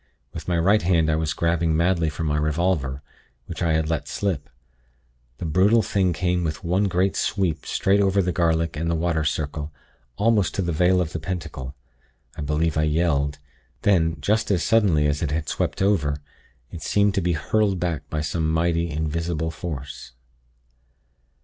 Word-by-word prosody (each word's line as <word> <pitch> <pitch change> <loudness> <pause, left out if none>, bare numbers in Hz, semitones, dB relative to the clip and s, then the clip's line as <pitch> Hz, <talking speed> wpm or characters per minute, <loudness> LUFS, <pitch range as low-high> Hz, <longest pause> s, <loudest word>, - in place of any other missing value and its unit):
With - - -7
my 90 -2 +1
right 100 +6 +3
hand 85 -3 +2
I - - +2
was 80 -1 -1
grabbing 85 -1 +1
madly 85 -1 +2
for 75 +2 -5
my 75 -2 0
revolver, 75 -3 0 0.4
which 85 - -7
I 85 -2 +2
had 80 0 +1
let 75 -3 -2
slip. 90 -8 -2 0.9
The - - -5
brutal 100 +8 +4
thing 95 -3 +1
came 90 +1 0
with 75 +1 -3
one 90 +4 +1
great 95 0 +1
sweep 90 -7 -1
straight 100 +1 +2
over 100 0 +2
the 90 -2 +1
garlic 85 -2 +1
and 85 +2 -2
the 85 - +1
'water 80 -1 0
circle,' 75 0 -2 0.5
almost 105 -2 +2
to 95 - 0
the 85 - -1
vale 90 +3 +3
of 80 -3 -3
the 80 - -3
pentacle. 80 -6 -5 0.6
I - - -6
believe 75 +2 0
I - - +3
yelled. 75 -2 +1 0.5
Then, 80 -5 +2
just 105 +9 +1
as 95 -5 +1
suddenly 95 -10 +3
as 75 0 0
it 80 - 0
had 75 0 -2
swept - - -1
over, 80 -8 +1 0.5
it 85 - -8
seemed 100 -1 +2
to 95 - 0
be 90 0 +1
hurled 100 +4 +1
back 80 -5 -3
by 75 - -2
some 80 +1 -1
mighty, 85 +1 +1
invisible 80 +1 -2
force. 75 -6 -7
85 Hz, 175 wpm, -23 LUFS, 75-90 Hz, 0.9 s, brutal